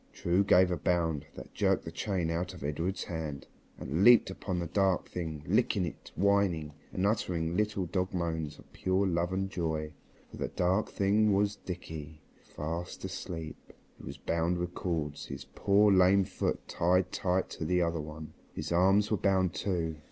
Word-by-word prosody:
True 90 +3 +2
gave 95 -2 +5
a 90 - 0
bound 80 -4 0
that - - -10
jerked - - +1
the - - -5
chain 90 -6 -1
out 90 +2 -2
of 85 - -10
Edred's 80 +7 -2
hand, 80 -5 -5 0.3
and 75 +8 -1
leaped 120 -4 +7
upon 95 -1 -4
the 85 - -1
dark 95 +1 +1
thing, 80 -4 -5
licking 90 +4 +2
it, 80 - -8
whining, 95 -6 +2 0.2
and 95 - -1
uttering 90 -6 0
little 105 -2 0
dog 90 +1 -1
moans 80 -4 -2
of - - -18
pure 95 +1 +1
love 85 -1 0
and 95 +1 -1
joy. 80 -3 -2 0.4
For - - -10
the - - -2
dark 95 +4 +1
something 105 +1 +3
was 100 +1 +1
Dickie, 80 -4 -7 0.2
fast 85 +5 -5
asleep. 85 -3 -7 0.3
He - - -13
was - - -7
bound 85 +1 0
with 90 0 -3
cords, 80 -5 -3
his - - -7
poor 100 +1 +4
lame 95 +1 +5
foot 95 0 -3
tied 90 +2 +2
tight 95 0 0
to 80 - -5
the 90 +1 +2
other 85 -1 -1
one. 75 +1 -8 0.2
His - - -4
arms 95 +5 +4
were 105 - +3
bound 95 -3 +2
too. 85 -5 -2
90 Hz, 175 wpm, -31 LUFS, 80-95 Hz, 0.4 s, leaped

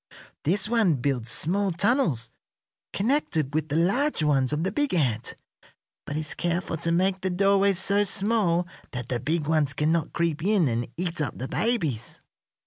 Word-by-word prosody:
This 190 +6 +1
one 220 -8 +3
builds 125 -3 -2
small 190 +9 +1
tunnels 170 - +1 0.6
connected 195 - 0
with 155 0 -1
the 145 - -1
large 200 - +2
ones 135 -3 +2
of 150 +2 -1
the 190 - -1
big 290 -2 0
ant, 120 -8 0 0.7
but 145 - -3
is 155 -1 -2
careful 175 0 -2
to 165 +1 -1
make 185 +2 +1
the 190 - -1
doorways 195 +1 +3
so 200 +2 +2
small 195 -3 +1 0.3
that 125 -1 -5
the 125 - -1
big 155 +5 -1
ones 155 -3 +1
cannot 160 +2 0
creep 165 -2 -1
in 195 -5 +3
and 120 -1 -1
eat 175 -2 -3
up 145 - -3
the 130 - -4
babies. 160 - -1
170 Hz, 165 wpm, -26 LUFS, 145-195 Hz, 0.7 s, one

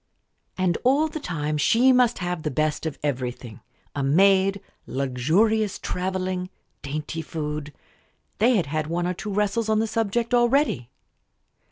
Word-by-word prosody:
And 185 -2 +1
all 275 +5 +3
the 315 0 -6
time 150 - -2
she 240 - +4
must 250 -2 +3
have 180 -2 -3
the 155 - -2
best 155 +3 -1
of 155 - -5
everything 125 -5 -4 0.4
a 145 - -1
maid, 195 +7 +4 0.3
luxurious 165 - +1
travelling, 185 0 -3 0.3
dainty 150 +3 -4
food. 150 -2 -5 0.7
They 240 +4 +4
had 185 -7 +2
had 155 +1 -2
one 170 +2 -1
or 180 - 0
two 210 +4 -6
wrestles 210 +2 0
on 215 - +3
the 220 - +2
subject 225 +2 -1
already. 240 - +2
180 Hz, 145 wpm, -24 LUFS, 150-220 Hz, 0.7 s, she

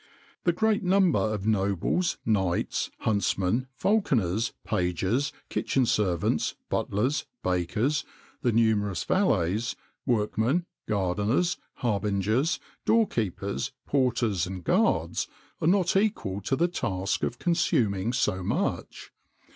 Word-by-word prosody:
"The 175 - +5
great 220 +4 +1
number 185 -1 +3
of 110 -2 -1
nobles, 100 - +1
knights, 95 -6 0
huntsmen, 100 +3 +1
falconers, 115 - +1
pages, 95 - 0 0.2
kitchen 130 -2 +1
servants, 100 -7 +1
butlers, 125 +9 0 0.2
bakers, 100 - 0 0.4
the 120 - +2
numerous 105 -5 +2
valets, 110 - +1 0.3
workmen, 120 - +1 0.2
gardeners, 105 - +1 0.3
harbingers, 105 - +1 0.2
door 225 -1 +4
keepers, 105 +4 -2
porters, 120 -9 +1
and 90 -1 -6
guards - - +1 0.3
are 155 - +1
not 185 0 +3
equal 155 - 0
to 135 - 0
the 170 +5 +2
task 95 - -2
of 120 - -2
consuming 115 - +1
so 95 -7 0
much. 90 - -2
110 Hz, 105 wpm, -27 LUFS, 95-145 Hz, 0.4 s, The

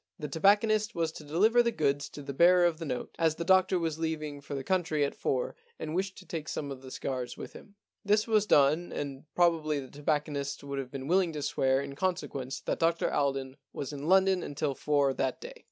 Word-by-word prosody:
The 150 - -5
tobacconist 210 +7 +3
was 165 -1 0
to 155 - -10
deliver 205 +11 +4
the 235 - +2
goods 145 -6 0
to 145 - -9
the 140 0 -5
bearer 175 +4 +6
of 170 -2 +1
the 165 - -4
note, 125 -4 -4
as 160 -2 +2
the 170 - -3
doctor 185 0 +4
was 165 -2 -2
leaving 155 -3 -3
for 145 - -6
the 135 - -4
country 160 -4 +1
at 140 - -3
four - - -2 0.2
and 155 - -5
wished 190 +2 -2
to 185 - -12
take 160 -4 -5
some 145 -2 -4
of 130 -1 -7
the 130 - -10
cigars 130 -1 -4
with - - -8
him. 205 - -14 0.3
This 210 +1 +3
was 215 -2 +2
done, 150 +3 +4
and 140 -1 -5
probably 160 -4 +2
the 130 -2 -9
tobacconist 145 -1 -2
would 140 -1 -4
have 130 -2 -5
been 135 0 -6
willing 180 0 +2
to 150 -1 -4
swear 135 -1 +1
in 140 0 -7
consequence 140 -7 -3
that - - -2
Dr 165 0 +1
Alden 135 -1 -1 0.2
was 140 +1 -5
in 145 +1 -5
London 190 0 +4
until 145 -2 -2
four 140 -1 +1
that 130 -1 -1
day. - - -8
155 Hz, 220 wpm, -30 LUFS, 140-180 Hz, 0.3 s, bearer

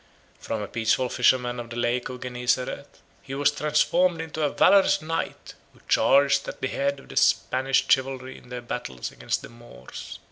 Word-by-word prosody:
From 110 -2 -4
a - - -5
peaceful 115 +4 0
fisherman 125 -1 +2
of 120 -1 -7
the 120 - -7
Lake 120 +1 -1
of 125 -1 -8
Gennesareth, 125 0 -3 0.2
he 135 0 -7
was 145 +1 +3
transformed 160 +4 +1
into 160 -1 -5
a 150 - +2
valorous 195 +3 +4
knight, 165 +1 -4 0.2
who - - -21
charged 140 0 +4
at - - -7
the 130 - -2
head 140 0 -1
of - - -17
the - - -10
Spanish 130 +1 +2
chivalry 130 -1 0
in - - -15
their 125 0 -6
battles 65 - -5
against 60 -1 -3
the - - -9
Moors. 115 - -11
130 Hz, 180 wpm, -25 LUFS, 120-145 Hz, 0.2 s, valorous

